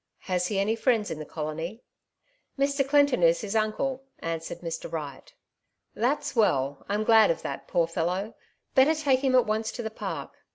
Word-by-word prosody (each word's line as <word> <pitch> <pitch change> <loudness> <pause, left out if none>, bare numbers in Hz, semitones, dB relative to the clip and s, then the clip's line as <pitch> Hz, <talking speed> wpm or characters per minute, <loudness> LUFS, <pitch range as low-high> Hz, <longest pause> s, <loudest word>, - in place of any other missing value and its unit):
Has 180 -1 -1
he 200 - -2
any 205 +3 +1
friends 225 -2 +1
in 155 - -4
the 155 - -6
colony 160 +7 -5 0.4
?" - - -44
''Mr. 275 -1 +1
Clinton 285 -6 +4
is 170 0 +4
his 210 0 -4
uncle," 240 +5 0
answered 165 -1 -5
Mr. 165 -1 -5
Wright. 145 -5 -6 0.6
"That's 260 +6 -1
well! 140 - +1
Tm 210 +2 0
glad 220 -2 +6
of 165 - -1
that, - - -5
poor 170 - +2
fellow 170 +3 -1
1 220 - -11 0.4
Better 275 +5 +5
take 285 -4 +2
him 260 -1 +3
at 250 - +5
once 220 +1 -1
to 240 - -5
the 220 - -4
Park." - - -5
215 Hz, 190 wpm, -27 LUFS, 165-255 Hz, 0.6 s, glad